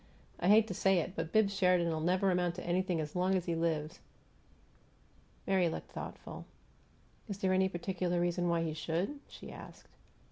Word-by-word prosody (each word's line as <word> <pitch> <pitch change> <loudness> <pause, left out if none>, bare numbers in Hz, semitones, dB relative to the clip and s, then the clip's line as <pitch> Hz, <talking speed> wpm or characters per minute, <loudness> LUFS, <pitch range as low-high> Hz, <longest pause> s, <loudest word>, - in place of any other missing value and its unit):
I 175 - 0
hate 215 +2 +7
to 195 - -4
say 195 +1 +3
it, 175 +2 -1
but 165 0 -3
Bibbs 215 -2 +3
Sheridan'll 180 -4 +2
never 185 +4 +2
amount 180 -1 +1
to 180 - -7
anything 180 0 0
as 150 +1 -4
long 185 +1 +2
as 180 -2 0
he 170 - -1
lives." 165 -1 -1 1.5
Mary 185 -3 +3
looked - - -6
thoughtful. - - -7 0.8
"Is 200 - -3
there 190 -1 +1
any 190 0 +3
particular 180 -1 -1
reason 175 0 +1
why 170 -1 +1
he 160 -1 -2
should?" 170 - -2
she - - -10
asked. - - -12
180 Hz, 175 wpm, -33 LUFS, 170-190 Hz, 1.5 s, hate